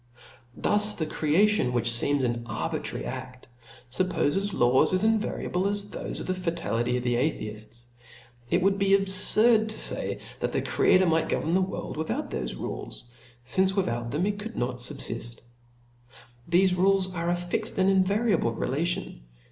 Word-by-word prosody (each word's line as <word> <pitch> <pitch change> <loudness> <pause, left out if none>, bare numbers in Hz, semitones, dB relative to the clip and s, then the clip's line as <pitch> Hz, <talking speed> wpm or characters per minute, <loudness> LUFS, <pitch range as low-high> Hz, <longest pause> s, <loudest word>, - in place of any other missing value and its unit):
Thus 210 0 +1
the 160 - -2
creation, 160 -1 +1
which 120 -1 0
feems 140 +4 +1
an 120 -1 -1
arbitrary - - -3
a6t, 125 - -7 0.5
fuppofeth 185 +4 0
laws 125 0 +3
as 185 +2 +1
invariable 215 -4 0
as 205 0 -1
thofe - - -4
of - - -5
ftie 185 0 -2
fatality 125 -9 -1
of 125 - -4
the 120 -1 0
Atheifts. 115 -3 -3 0.7
It - - +1
would 195 +1 +2
be 195 0 +4
abfurd 215 +3 +5
to 220 - -4
fay, - - -1 0.2
that - - -2
the - - -1
Creator 185 0 +3
might 165 -2 +1
govern 160 - -1
the 190 - +3
world 185 -4 -4
without 160 0 -3
thofe 60 -1 -4
rules, - - -7 0.4
fince 190 +9 +2
without 120 - -1
them 150 +8 -1
it 205 0 -2
could 225 +2 -7
not 125 0 -2
fubfift. 120 -2 -2 1.1
Thefe 180 +1 +3
rules 190 0 +2
are 170 -1 -2
a 175 - +2
fixt 175 0 -3
and 190 0 +3
invariable 195 - +2
relation. 145 - -3
175 Hz, 155 wpm, -26 LUFS, 125-195 Hz, 1.1 s, abfurd